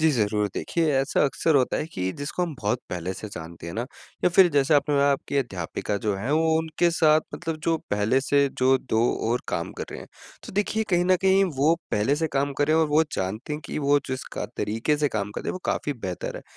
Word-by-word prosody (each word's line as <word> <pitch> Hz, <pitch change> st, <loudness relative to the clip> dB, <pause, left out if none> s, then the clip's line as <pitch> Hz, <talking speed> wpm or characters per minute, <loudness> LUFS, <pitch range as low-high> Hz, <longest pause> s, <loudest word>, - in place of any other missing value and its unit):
जी, 160 Hz, 0 st, +4 dB
ज़रूर 105 Hz, -5 st, +1 dB
देखिए 165 Hz, -2 st, 0 dB
ऐसा 135 Hz, +2 st, +2 dB
अक्सर 155 Hz, +3 st, +1 dB
होता 130 Hz, -2 st, +2 dB
है -, -, -2 dB
कि 95 Hz, 0 st, -2 dB
जिसको 145 Hz, +5 st, -3 dB
हम 170 Hz, -3 st, -2 dB
बहुत 110 Hz, +4 st, 0 dB
पहले 90 Hz, +1 st, -3 dB
से 105 Hz, -, -7 dB
जानते 85 Hz, -3 st, -9 dB
हैं 85 Hz, -, -5 dB
ना? 115 Hz, -, -1 dB, 0.4 s
या -, -, +6 dB
फ़िर 185 Hz, +1 st, +6 dB
जैसे 140 Hz, +1 st, +3 dB
आपने 145 Hz, +1 st, +2 dB
बताया 140 Hz, 0 st, +4 dB
आपकी 140 Hz, +1 st, -3 dB
अध्यापिका 100 Hz, -5 st, -2 dB
जो 105 Hz, -2 st, +1 dB
हैं, 110 Hz, +8 st, -3 dB
वो 160 Hz, +1 st, +3 dB
उनके 160 Hz, +2 st, +1 dB
साथ 155 Hz, -2 st, +4 dB
मतलब 165 Hz, -1 st, -4 dB
जो 165 Hz, -1 st, +2 dB
पहले 105 Hz, +6 st, +2 dB
से 140 Hz, +1 st, +2 dB
जो 130 Hz, +1 st, +4 dB
2 110 Hz, -4 st, -1 dB, 0.3 s
और 120 Hz, -, +1 dB
काम 85 Hz, -, -2 dB
कर -, -, -3 dB
रहे -, -, -7 dB
हैं। -, -, -10 dB, 0.4 s
तो -, -, -9 dB
देखिए 210 Hz, +2 st, 0 dB
कहीं 175 Hz, -1 st, +3 dB
न 185 Hz, +1 st, +4 dB
कहीं 190 Hz, 0 st, +5 dB
वो 150 Hz, +5 st, +4 dB, 0.2 s
पहले 110 Hz, +8 st, +1 dB
से 160 Hz, +1 st, 0 dB
काम 140 Hz, +1 st, 0 dB
कर 145 Hz, -, +3 dB
रहे 155 Hz, -, +4 dB
हैं 160 Hz, -, +4 dB
और 155 Hz, -, 0 dB
वो 150 Hz, +2 st, +4 dB
जानते 105 Hz, +10 st, -3 dB
हैं 150 Hz, -, -3 dB
कि -, -, -4 dB
वो 145 Hz, 0 st, +3 dB
जिस 130 Hz, 0 st, -3 dB
क -, -, -2 dB
तरीके 115 Hz, +8 st, 0 dB
से 145 Hz, 0 st, +1 dB
काम 105 Hz, -4 st, -3 dB
कर -, -, -5 dB
रहे -, -, -5 dB
हैं, -, -, 0 dB
वो -, -, -5 dB
काफ़ी 145 Hz, -, -1 dB
बेहतर 95 Hz, -9 st, -5 dB
है। -, -, -8 dB
140 Hz, 250 wpm, -25 LUFS, 110-160 Hz, 0.4 s, या